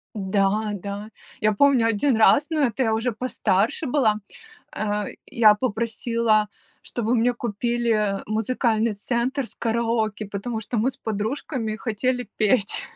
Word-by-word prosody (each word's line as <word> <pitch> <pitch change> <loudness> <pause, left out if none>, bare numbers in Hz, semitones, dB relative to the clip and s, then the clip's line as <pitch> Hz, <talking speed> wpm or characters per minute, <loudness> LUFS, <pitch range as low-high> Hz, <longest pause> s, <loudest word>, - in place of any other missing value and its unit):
Да, 205 +2 0
да. 205 +2 -6 0.3
Я 215 0 +3
помню 255 0 +4
1 230 +3 +2
раз, 280 +6 +5
но 310 -2 0
это 255 0 +1
я 220 -2 +2
уже 230 +2 0
постарше 220 - 0
была, 245 -6 +2 0.6
э, 210 -1 -1 0.2
я 215 -3 +5
попросила, 230 -1 0 0.3
чтобы 240 0 -1
мне 245 +1 +3
купили 230 -3 0
музыкальный 220 0 0
центр 240 +5 -1
с - - -11
караоке, 225 -2 -1
потому 220 +3 -4
что 225 +1 -3
мы 250 +5 +2
с 270 - -17
подружками 220 0 -3
хотели 245 +1 -2
петь. 215 -1 +2
225 Hz, 135 wpm, -24 LUFS, 210-245 Hz, 0.6 s, раз